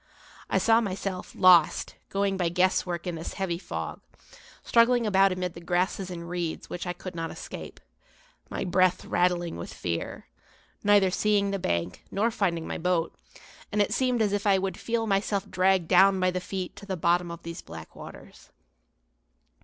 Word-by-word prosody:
I - - +2
saw 225 0 +4
myself, 195 -2 -4
lost, 180 -4 +5 0.2
going 195 0 0
by 180 -3 0
guesswork 180 -1 +1
in 180 - -2
this 165 0 -6
heavy 175 -3 -2
fog, - - -5 0.6
struggling 235 0 +4
about 195 -2 +4
amid 180 -1 -3
the 170 - -10
grasses 180 +2 -1
and 170 -2 -7
reeds 175 -2 -4
which 180 +1 -5
I 180 - -1
could 185 +1 -8
not 165 -1 -4
escape, - - -8 0.7
my - - -3
breath 185 0 +2
rattling 175 - 0
with 85 - -7
fear, 85 -2 -4 0.6
neither 205 -2 +5
seeing 200 0 +1
the 195 - -2
bank, 85 - -2
nor 220 +4 +1
finding 170 -7 -1
my - - -4
boat; 175 -1 0 0.6
and 210 - -1
it 205 - +2
seemed 250 -3 +1
as 205 -2 0
if 205 0 -1
I 195 -1 +5
would 190 0 -2
feel 230 -1 -1
myself 200 -1 0
dragged 185 -2 +2
down 190 +2 +5
by 185 0 +2
the 180 0 -3
feet 185 -1 -5
to 200 - -11
the 190 -2 -3
bottom 175 +1 +2
of 170 0 -8
these 170 0 -7
black 80 -1 -11
waters. - - -12
185 Hz, 175 wpm, -27 LUFS, 175-200 Hz, 0.7 s, lost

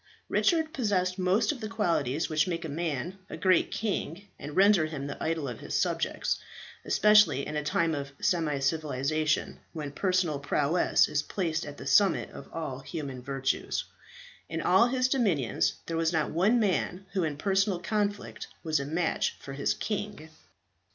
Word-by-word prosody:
Richard 320 -3 +2
possessed 190 -7 0
most 195 +4 +2
of 280 - -7
the 215 - -4
qualities 165 - 0
which 155 +2 +1
make 170 -2 -3
a - - -4
man 165 +3 -3
a - - -6
great 185 +1 +3
king 200 -3 -3
and 145 - -7
render 195 -4 +5
him 145 -3 -5
the 145 - -6
idol 160 -3 -1
of 120 -4 -6
his - - -2
subjects, - - -1 0.4
especially 210 -10 +5
in 150 - -5
a 150 - 0
time 165 +2 +1
of 140 -2 -4
semi 165 -7 +1
civilization, 150 +1 0
when 150 -4 -5
personal 180 -2 0
prowess 145 +4 +2
is 145 - 0
placed 165 -1 -2
at 145 0 -8
the - - -9
summit 200 -2 +3
of - - -11
all 150 -6 -4
human 135 -2 -6
virtues. 135 0 -1 0.7
In 160 - -3
all 185 +8 +4
his 255 0 +1
dominions 185 - +1
there 165 - -3
was 165 0 +1
not 160 -3 0
one 200 +9 +3
man 195 -2 0
who 190 -3 +1
in 150 -3 -2
personal 195 +2 +1
conflict 205 +2 -2 0.2
was 155 -3 +1
a 140 - -3
match 165 +4 0
for 135 - -8
his 140 +1 0
king. 205 -6 -4
165 Hz, 170 wpm, -29 LUFS, 145-195 Hz, 0.7 s, render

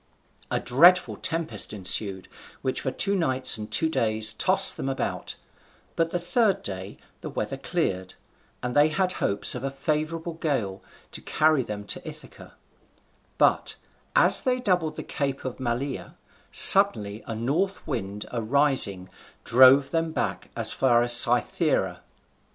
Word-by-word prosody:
A - - -1
dreadful 175 +9 +4
tempest 165 -8 -2
ensued, 95 -1 0 0.4
which 130 - -2
for - - -2
two 200 +9 -1
nights 130 - +1
and 105 0 -7
two 110 +9 +1
days 110 -7 +1
tossed 190 +1 +3
them 135 - -4
about, 135 - -4 0.6
but 165 0 0
the 175 - -2
third 195 +2 0
day 95 0 -6 0.2
the - - -8
weather - - -4
cleared, 95 0 -3 0.5
and 125 0 -4
they 145 +1 +5
had 185 +4 -1
hopes 100 - 0
of 125 - -7
a 135 - -2
favourable 155 +4 -3
gale 125 -12 -3 0.3
to - - -7
carry 155 -2 +1
them 105 -4 -7
to - - -4
Ithaca; 155 0 -11 0.8
but, - - +1 0.4
as - - +3
they 255 -2 -1
doubled 180 -9 -1
the - - -7
Cape 140 -2 -4
of 130 0 -6
Malea, 130 +2 -4 0.4
suddenly 110 - +5
a 115 - -5
north 155 - -2
wind 105 -7 -5
arising 120 -6 0 0.4
drove 130 +3 +5
them 165 -1 -1
back - - -4
as - - +2
far 120 -3 +2
as 120 0 +1
Cythera. 120 - +3
135 Hz, 145 wpm, -25 LUFS, 110-165 Hz, 0.8 s, they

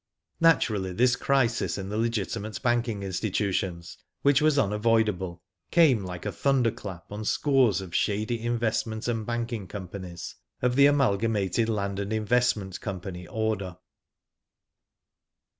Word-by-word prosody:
Naturally 110 - +3
this 125 +5 +3
crisis 125 -2 +1
in 95 -1 -5
the 105 - -3
legitimate 110 -2 -2
banking 120 -4 0
institutions, 95 -2 -2 0.2
which 140 0 +4
was 155 -1 +3
unavoidable, 105 -6 +1 0.3
came 140 - +4
like 90 0 -7
a 105 - -1
thunderclap 110 -6 -1
on 105 +1 -5
scores 125 -4 +2
of 90 -3 -9
shady 110 +5 0
investment 115 -1 -1
and 115 -3 -2
banking 120 -4 -3
companies 90 -3 -7 0.2
of 125 0 +1
the 140 +1 +7
Amalgamated 115 -5 +1
Land 100 -2 -1
and 100 +1 -3
Investment 110 -3 0
Company 90 -2 -6
order. 105 -5 -2
110 Hz, 120 wpm, -27 LUFS, 95-120 Hz, 0.3 s, the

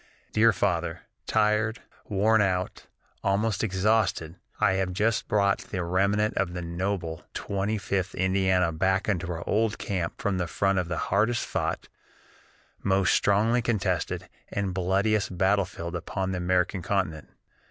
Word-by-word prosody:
"DEAR 115 +2 +5
FATHER: 85 -6 -1 0.3
"Tired, 110 +1 +2 0.3
worn 110 +2 +3
out, 95 -2 -1 0.4
almost 100 +1 +1
exhausted, 95 -5 +1 0.2
I - - +4
have 95 -1 -1
just 110 +4 +1
brought 100 -3 +2
the 90 - -4
remnant 100 +5 +1
of 90 -2 0
the 90 -1 -4
noble 85 -1 -3
Twenty 100 +2 -1
fifth 95 -2 -2
Indiana 95 -2 +2
back 95 +4 +1
into 90 -4 0
our 85 0 -5
old 110 0 +1
camp 90 -4 -3
from 100 -2 -1
the 90 - -1
front 100 +2 +1
of 90 - -2
the 85 -1 -3 0.2
hardest 110 +4 +2
fought, - - -2 0.9
most 95 -1 +2
strongly 110 +4 +3
contested, 95 -8 -1 0.2
and 100 -2 -2
bloodiest 95 +1 +1
battlefield 90 -2 0
upon 95 +2 -3
the 95 - -2
American 90 +1 +1
continent. 85 -4 -2
95 Hz, 140 wpm, -27 LUFS, 90-105 Hz, 0.9 s, DEAR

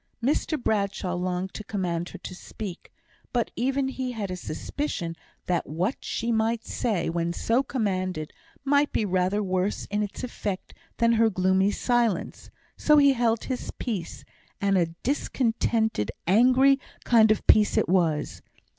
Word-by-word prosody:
Mr 300 +3 +1
Bradshaw 200 -5 -1
longed 180 +1 -2
to 215 - -6
command 180 -5 -2
her - - -9
to - - -8
speak; 185 0 -8 0.4
but 240 -2 0
even 265 +2 0
he 260 -1 -3
had 205 -5 -4
a - - -2
suspicion 175 - -4 0.3
that 180 -1 -1
what 180 - -1
she 235 0 -2
might 225 0 0
say, 205 -8 -1
when 170 0 -1
so 230 +8 +1
commanded, 185 - -2 0.3
might 285 +1 +3
be 215 - 0
rather 190 +2 +1
worse 185 +1 -1
in 205 0 0
its 205 +4 -4
effect 205 -6 -4 0.2
than 230 0 +3
her 225 -1 +4
gloomy 190 0 +2
silence; 235 -3 0 0.3
so 300 0 +4
he 280 -1 +6
held 230 -3 +1
his 255 -2 -4
peace, 205 -9 -4 0.3
and 200 -1 +2
a 175 -3 +3 0.2
discontented, 225 - 0 0.2
angry 255 +8 +5 0.2
kind 225 -2 +5
of 215 - +1
peace 210 -1 +5
it - - +3
was. 170 -4 +1
210 Hz, 150 wpm, -26 LUFS, 185-240 Hz, 0.4 s, he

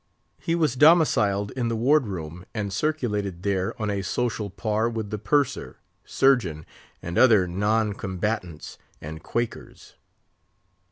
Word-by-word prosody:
He 165 - -1
was 155 -7 +1
domiciled 125 - +4
in 125 -2 -2
the 115 - -1
Ward 130 +3 +3
room, 85 -2 -6
and 100 -3 -3
circulated 105 - -2
there 95 +2 -1
on 105 -1 -1
a 100 -1 -2
social 110 +1 -2
par 110 +3 -1
with 110 -3 -5
the 105 - -3
Purser, 135 +6 0 0.3
Surgeon, 115 - +2 0.4
and 85 +1 -2
other 110 -8 +5
non 105 +4 0
combatants 95 -4 -4 0.2
and 80 +1 -8
Quakers. 120 +6 -5
105 Hz, 130 wpm, -25 LUFS, 95-120 Hz, 0.4 s, other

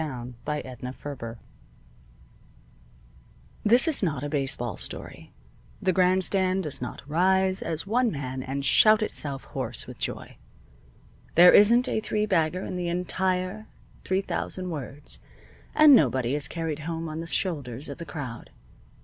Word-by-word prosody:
IV 160 - -2
A 125 -3 -7
BUSH 150 0 -2
LEAGUE 125 0 -7
HERO 120 -5 -6 2.3
This 240 +8 +5
is 315 - +2
not 150 -8 -1
a 145 - -3
baseball 135 - -1
story. - - -4 0.5
The 185 -1 +1
grandstand 185 +1 +2
does 150 -6 -4
not 125 +2 -7
rise 190 +4 +2
as 165 0 -2
one 240 +4 +2
man 130 -6 -4
and 135 +2 -4
shout 215 +9 +6
itself 140 -9 -3
hoarse - - -2
with - - -11
joy. - - -5 1.0
There 175 +2 +9
isn't 235 +5 +6
a - - 0
three 215 -1 -1
bagger 180 -2 0
in 180 - -5
the 175 -1 -2
entire 185 +3 -1 0.4
three 190 +1 0
thousand 185 -2 -4
words, 145 -1 -5 0.6
and 305 -2 +8
nobody 130 - +3
is 145 -2 0
carried 160 -2 -4
home 165 +1 -4
on 155 0 -5
the 165 - -6
shoulders 145 -7 -2
of - - -8
the - - -5
crowd. 135 -7 -7
165 Hz, 150 wpm, -26 LUFS, 140-190 Hz, 2.3 s, There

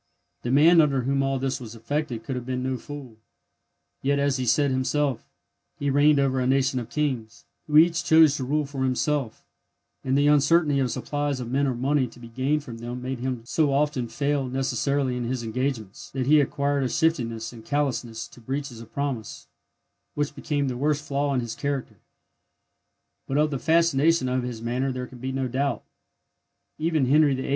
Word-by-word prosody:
The 120 - -4
man 160 +6 +6
under 140 -4 +1
whom 135 +2 +1
all 135 0 0
this 135 0 -2
was 120 -2 -9
effected 125 0 -3
could 130 +3 -4
have 125 - -4
been 125 0 -3
no 130 0 -1
fool; 130 -3 -9 0.8
yet, 140 +1 +1
as 140 -1 +1
he 130 -1 -2
said 140 +4 +3
himself, 130 0 -1 0.5
he 140 -1 -1
reigned 145 +2 +5
over 135 -1 +2
a 125 - 0
nation 135 0 +2
of 120 -1 -7
kings, 125 -6 -3 0.2
who 150 0 +3
each 170 +2 +5
chose 160 -3 +6
to 130 - -3
rule 150 +3 0
for 135 -1 -4
himself; 130 -1 -1 0.6
and 135 +1 +1
the 145 - +3
uncertainty 150 0 +4
of 130 -2 +1
supplies 145 +1 -2
of 120 -1 -5
men 140 +2 +2
or 130 - -1
money 135 +2 +1
to 120 - -15
be 120 -1 -11
gained 135 +5 0
from 115 -4 -9
them 120 +2 -5
made 130 0 -4
him 125 -2 -3
so 150 +3 +1
often 140 -3 0
fail 140 +3 -1
necessarily 135 0 0
in 125 -1 -3
his 125 0 -2
engagements, 115 -3 -3
that 130 -2 -3
he 150 +2 +6
acquired 140 0 0
a 130 - 0
shiftiness 115 -9 0
and 115 -2 -11
callousness 120 -4 -2
to 120 - -16
breaches 130 -1 -4
of 115 - -13
promise, 135 -7 -4 0.7
which 145 0 -1
became 145 0 -1
the 125 -2 -3
worst 150 +2 0
flaw 140 +1 0
in 130 -2 +1
his 115 -1 -5
character. 140 +1 -3 1.3
But 135 - -1
of 150 0 +2
the 135 - -2
fascination 165 -3 +3
of 130 0 0
his 120 -2 -6
manner 125 +3 -1
there 125 0 -4
can 125 0 -13
be 130 +2 -3
no 130 -1 -1
doubt. 130 -1 -1 1.0
Even 155 -3 +1
Henry 145 +1 +4
VIII. 130 - -4
135 Hz, 195 wpm, -25 LUFS, 125-145 Hz, 1.3 s, man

